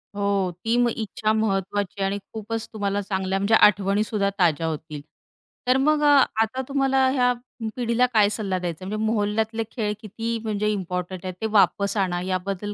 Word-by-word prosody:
हो. 200 -2 0
ती 225 +1 +2 0.3
इच्छा 215 0 -1
महत्त्वाची 200 -2 -1
आहे 195 - +2
आणि 200 +1 -2 0.2
खूपच 220 +1 -4
तुम्हाला 205 -1 -1
चांगल्या 190 -1 -2
म्हणजे 200 +3 +3
आठवणीसुद्धा 205 0 +3
ताज्या 165 -2 +2
होतील 155 -1 -5 0.7
तर 255 - +4
मग 300 +3 +2
अ, - - +5 0.3
आता 225 +4 -1
तुम्हाला 270 -1 +2
ह्या 250 -2 +3 0.4
पिढीला 245 0 +2
काय 210 -2 +5
सल्ला 200 -4 -2
द्यायचा 175 +1 -5
आहे - - -5
म्हणजे 215 +1 -2
मोहल्ल्या 210 0 +1
तले 225 - -1
खेळ 210 -4 -2
किती 225 +2 -4
म्हणजे 210 -1 -1
इम्पोर्टंट 180 -1 -4
आहेत 185 - -3
ते - - -1
वापस 200 -1 +3
आणा 180 -2 0
याबद्दल 190 +2 -3
205 Hz, 170 wpm, -24 LUFS, 190-225 Hz, 0.7 s, अ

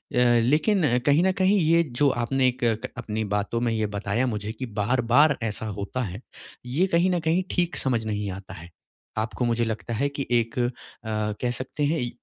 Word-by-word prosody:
लेकिन 125 - +3
कहीं 145 +4 +4
न 190 - +4
कहीं, 190 +2 +2
ये 165 0 +4
जो 140 -1 +1
आपने 130 +1 +1
एक 125 0 -1 0.3
क - - -6
अपनी 110 -3 -3
बातों 105 +3 -1
में 120 -1 +1
ये 110 -1 0
बताया 105 +4 -1
मुझे 105 -2 -3
कि 120 +4 -6
बार-बार 120 +6 +3
ऐसा 110 0 -2
होता 105 +4 -4
है, 100 0 -6 0.4
ये 140 +9 +1
कहीं 175 +1 +2
न 175 - +1
कहीं 165 +3 +1
ठीक 175 -1 0
समझ 120 -4 0
नहीं 105 -1 -2
आता 95 0 -9
है। 85 -3 -10 0.5
आपको, 110 +1 -1
मुझे 120 0 +1
लगता 115 +1 -4
है 140 +6 0
कि 140 -1 -5
एक 115 -1 +1
अ, 120 0 +2 0.4
कह 110 +2 -2
सकते 130 +4 -4
हैं, 155 +3 +1
इ 120 - -2
120 Hz, 195 wpm, -25 LUFS, 110-145 Hz, 0.5 s, कहीं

